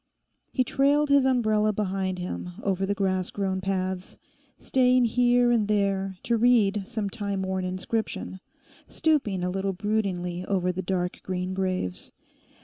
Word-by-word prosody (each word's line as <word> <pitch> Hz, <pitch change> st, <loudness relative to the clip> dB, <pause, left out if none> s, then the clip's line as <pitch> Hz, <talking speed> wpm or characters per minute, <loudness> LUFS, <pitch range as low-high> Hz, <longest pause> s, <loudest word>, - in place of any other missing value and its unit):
He 255 Hz, -, +2 dB
trailed 285 Hz, +3 st, +2 dB
his 280 Hz, -1 st, +5 dB
umbrella 215 Hz, -5 st, +2 dB
behind 190 Hz, -2 st, -2 dB
him 180 Hz, 0 st, -5 dB
over 195 Hz, -1 st, 0 dB
the 200 Hz, -, 0 dB
grass 185 Hz, -2 st, 0 dB
grown 190 Hz, -2 st, -2 dB
paths; 185 Hz, -1 st, -3 dB, 0.4 s
staying 255 Hz, -1 st, +3 dB
here 245 Hz, +1 st, +3 dB
and 225 Hz, -4 st, +2 dB
there 195 Hz, -2 st, 0 dB
to 235 Hz, 0 st, +1 dB
read 215 Hz, -4 st, +3 dB
some 220 Hz, -4 st, -2 dB
time 200 Hz, -1 st, -3 dB
worn 190 Hz, -1 st, -2 dB
inscription; 190 Hz, +1 st, -3 dB, 0.5 s
stooping 265 Hz, -, 0 dB
a 180 Hz, -, -1 dB
little 195 Hz, +1 st, -1 dB
broodingly 185 Hz, -3 st, -2 dB
over 185 Hz, -2 st, 0 dB
the 185 Hz, +1 st, -4 dB
dark 180 Hz, -1 st, -2 dB
green 185 Hz, 0 st, -3 dB
graves. 185 Hz, -, -2 dB
195 Hz, 140 wpm, -26 LUFS, 185-225 Hz, 0.5 s, his